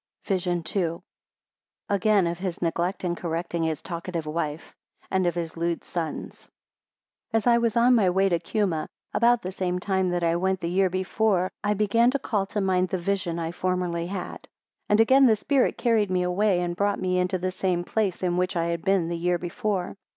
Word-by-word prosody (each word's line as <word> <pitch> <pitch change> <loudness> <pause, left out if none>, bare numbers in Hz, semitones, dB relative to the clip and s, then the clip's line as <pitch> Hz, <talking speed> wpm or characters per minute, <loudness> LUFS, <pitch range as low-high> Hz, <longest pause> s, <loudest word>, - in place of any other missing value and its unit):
VISION 180 -3 -1
II. 170 -3 0 0.9
Again, 200 -1 +3
of 170 0 -2
his 185 -3 -3
neglect 175 +3 -1
in 175 -1 0
correcting 170 0 -3
his 160 -2 -1
talkative 170 -2 -4
wife; 155 0 -4 0.4
and 190 -2 +2
of 175 - 0
his 165 -2 -4
lewd 170 0 -2
sons. 165 -3 -5 0.8
AS 225 -1 +1
I 235 -1 +5
was 235 -1 0
on 245 +2 +5
the 195 -6 +3
way 190 +2 +3
to 170 -3 +1
Cuma, 190 -8 -1 0.3
about 235 0 +3
the 185 - -4
same 180 -1 -2
time 190 0 0
that 175 -1 -1
I 165 0 +2
went 190 +1 0
the 170 -1 -3
year 190 +1 +3
before, 185 +1 0
I 210 0 +1
began 215 +4 +3
to 275 - +1
call 205 -7 -1
to 210 - -3
mind 185 -1 +1
the 185 - -1
vision 185 -1 -2
I 165 -1 -3
formerly 175 -1 -1
had. 185 -1 -6 0.4
And 210 - +4
again 260 +4 +6
the 220 - +5
spirit 270 +4 +1
carried 225 -4 +2
me 180 -1 +1
away, 180 +1 +2
and 175 -1 -2
brought 200 +2 0
me 185 -1 0
into 180 +1 0
the 185 +1 -2
same 185 -2 -1
place, 195 -1 -1
in 175 -1 +1
which 180 +1 0
I 170 0 0
had 170 -1 -3
been 195 -3 +2
the 170 - -2
year 175 +1 +1
before. 185 +2 -3
185 Hz, 200 wpm, -25 LUFS, 175-200 Hz, 0.9 s, again